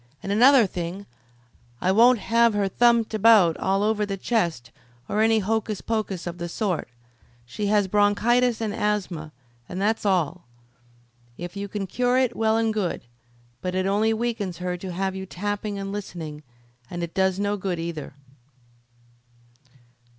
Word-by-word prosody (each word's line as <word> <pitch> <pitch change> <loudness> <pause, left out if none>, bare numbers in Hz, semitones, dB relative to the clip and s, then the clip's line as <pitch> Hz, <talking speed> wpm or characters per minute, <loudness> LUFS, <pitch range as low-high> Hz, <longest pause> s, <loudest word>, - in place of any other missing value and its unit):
And 195 - -3
another 245 +3 +6
thing, 180 +2 -5 0.7
I 185 - +1
won't 240 +5 +6
have 230 +1 +2
her 200 -1 +1
thumped 235 +2 +3
about 215 -6 +5
all 195 +1 0
over 215 0 +1
the 200 -1 -3
chest, 170 - -1 0.4
or 210 - 0
any 225 0 +4
hocus 215 0 -1
pocus 215 -5 -3
of 175 0 -6
the 170 0 -4
sort. 185 -2 -2 0.6
She 200 - -4
has 205 -1 +2
bronchitis 220 +4 +2
and 215 -2 -2
asthma, 190 -8 -2 0.4
and 185 - -5
that's 215 +3 0
all. 180 -5 0 0.9
If 175 +2 -7
you 200 0 -4
can 200 0 -4
cure 245 +6 +1
it 255 -2 +1
well 220 0 +2
and 225 -1 +1
good. 205 -5 -2 0.6
But 180 0 -3
it 185 0 0
only 210 +3 +2
weakens 220 -5 -2
her 180 0 -3
to 180 +1 -7
have 190 +2 -2
you 190 0 -6
tapping 205 +2 -3
and 195 0 -5
listening, 165 -7 -6 0.5
and 175 0 -4
it 170 - -5
does 190 -1 +1
no 205 +1 0
good 190 -3 -3
either." 165 -4 -5
200 Hz, 160 wpm, -24 LUFS, 180-220 Hz, 0.9 s, another